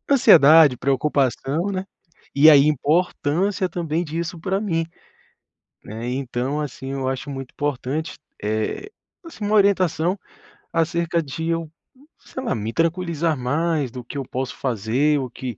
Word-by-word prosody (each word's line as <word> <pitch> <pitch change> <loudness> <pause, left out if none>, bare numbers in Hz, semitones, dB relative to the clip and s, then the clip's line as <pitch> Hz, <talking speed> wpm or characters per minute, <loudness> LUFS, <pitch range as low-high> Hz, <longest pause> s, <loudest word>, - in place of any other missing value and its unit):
ansiedade, 160 - +7
preocupação, 140 +4 0
né, 190 0 -3 0.5
e 155 +3 +8
a 150 - +8
importância 160 +5 +1
também 170 -1 -2
disso 170 +2 -4
pra 190 +3 -1
mim, 165 -6 -1 1.0
né. 115 +3 -6
Então, 130 +2 -2
assim, 135 -2 -6
eu 135 -1 -2
acho 135 +2 -4
muito 135 -1 -7
importante, 145 +2 -3 0.2
eh, 110 - -2 0.3
assim, 285 -10 -8
uma 210 +1 0
orientação 185 -2 +2 0.6
acerca 165 0 0
de 160 +3 -5
eu, 165 -2 -2 0.5
sei 260 - -8
lá, 235 - -1
me 110 +1 -3
tranquilizar 165 -2 0
mais 145 +1 -1
do 125 -1 -8
que 135 +4 -8
eu 135 - -2
posso 130 +1 -4
fazer, 130 +5 0
o 130 -2 -4
que 125 -3 -7
150 Hz, 140 wpm, -22 LUFS, 130-170 Hz, 1.0 s, e